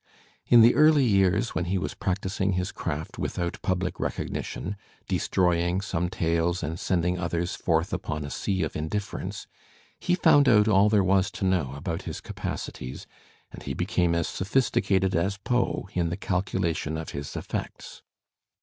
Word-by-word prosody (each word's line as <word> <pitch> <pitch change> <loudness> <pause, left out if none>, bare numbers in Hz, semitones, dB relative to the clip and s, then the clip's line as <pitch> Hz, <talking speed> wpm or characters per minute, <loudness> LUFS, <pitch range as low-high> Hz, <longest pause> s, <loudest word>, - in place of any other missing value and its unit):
In 120 -1 +8
the 115 +2 +7
early 155 -3 +5
years 100 +1 +2
when 90 - -1
he 95 +2 0
was 90 - -3
practising 95 0 -1
his 90 +1 -1
craft 80 -2 -5
without 85 0 -3
public 90 -1 -1
recognition, 100 +4 -3 0.3
destroy 90 -2 +1
ing 85 +2 0
some 90 -3 -2
tales 85 +1 0
and 80 +2 -3
sending 90 0 0
others 85 0 -2
forth 80 -1 0
upon 75 -1 -3
a 70 - -7
sea 95 -2 -1
of - - -3
indiffer 80 +7 -3
ence, - - -6 0.5
he 180 - +1
foimd 150 -6 +5
out 105 -3 +5
all 105 0 +5
there 105 -2 +4
was 95 0 +3
to - - -3
know 85 -8 +1
about 80 +3 -4
his - - -6
capacities, 60 +1 -6 0.5
and - - -10
he - - -4
became 85 -1 +1
as 85 -1 0
sophisticated 95 -3 +1
as 95 +4 +1
Foe 125 -5 0
in 85 -2 0
the 85 - -3
calculation 90 -5 -1
of 80 - -5
his 70 0 -6
effects. - - -6
90 Hz, 165 wpm, -26 LUFS, 85-100 Hz, 0.5 s, In